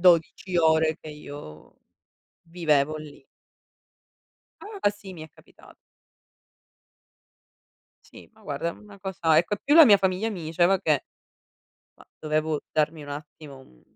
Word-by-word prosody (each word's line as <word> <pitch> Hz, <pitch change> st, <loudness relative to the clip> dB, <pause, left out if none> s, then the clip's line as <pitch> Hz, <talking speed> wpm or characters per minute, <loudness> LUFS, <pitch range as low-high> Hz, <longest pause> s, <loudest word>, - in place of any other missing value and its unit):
12 180 Hz, +1 st, +3 dB
ore 160 Hz, -1 st, +3 dB
che -, -, -10 dB
io 145 Hz, -, -11 dB, 0.7 s
vivevo 155 Hz, -3 st, +1 dB
lì. 145 Hz, -3 st, -12 dB, 1.4 s
Ah. 415 Hz, -, -1 dB
Sì, 205 Hz, -1 st, -10 dB
mi 160 Hz, -3 st, -9 dB
è 160 Hz, -, -13 dB
capita -, -, -21 dB, 2.4 s
Sì, -, -, -15 dB
ma -, -, -23 dB
guarda 170 Hz, -, -3 dB
è -, -, -5 dB
una 205 Hz, +2 st, -15 dB
cosa 175 Hz, -5 st, +1 dB
ecco, 170 Hz, +4 st, +2 dB
e -, -, -16 dB
più 290 Hz, -, +3 dB
la 325 Hz, -2 st, +10 dB
mia 205 Hz, -5 st, +7 dB
famiglia 190 Hz, +3 st, 0 dB
mi 185 Hz, -6 st, -6 dB
diceva 175 Hz, +4 st, +2 dB
che 150 Hz, -5 st, +1 dB, 0.9 s
ma -, -, -19 dB
dovevo 155 Hz, 0 st, -1 dB
darmi 155 Hz, 0 st, 0 dB
un 145 Hz, -, -11 dB
attimo 145 Hz, -1 st, -9 dB
un 60 Hz, -, -21 dB
160 Hz, 140 wpm, -25 LUFS, 150-190 Hz, 2.4 s, la